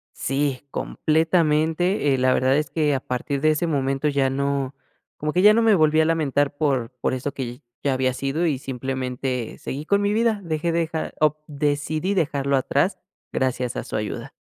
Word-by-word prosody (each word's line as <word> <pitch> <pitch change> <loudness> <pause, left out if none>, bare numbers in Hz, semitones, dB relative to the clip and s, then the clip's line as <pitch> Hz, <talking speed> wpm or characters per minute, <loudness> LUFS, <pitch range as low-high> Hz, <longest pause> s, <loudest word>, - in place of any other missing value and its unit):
Sí, 135 0 -1
completamente. 160 0 +1
Eh, - - +1
la 130 0 +3
verdad 130 +2 +3
es 150 - -1
que 150 -3 +1
a 135 - 0
partir 135 +3 -3
de 155 +1 +4
ese 155 +3 0
momento 135 -1 0
ya 140 -2 +2
no 140 0 -1 0.4
como 150 0 -2
que 180 - +3
ya 210 +2 +8
no 230 - +3
me 225 -2 +5
volví 155 -2 +3
a 155 - +3
lamentar 145 -3 +1
por 135 -6 0
por - - 0
eso 130 +2 -3
que 125 -2 -6 0.2
ya 140 -2 +2
había 130 0 +1
sido 140 +6 -1
y, 150 -5 +1
simplemente, 130 -1 -3
seguí 145 +3 -6
con 200 +4 +2
mi 205 0 +1
vida. 225 -1 +1
Dejé 165 +1 -1
dejar 165 -1 -2
o 155 0 +3
decidí 150 +5 -1
dejarlo 140 -6 +1
atrás 140 +8 0 0.3
gracias 125 -1 -1
a - - -3
su - - -6
ayuda. 105 -1 -4
145 Hz, 185 wpm, -23 LUFS, 135-160 Hz, 0.4 s, ya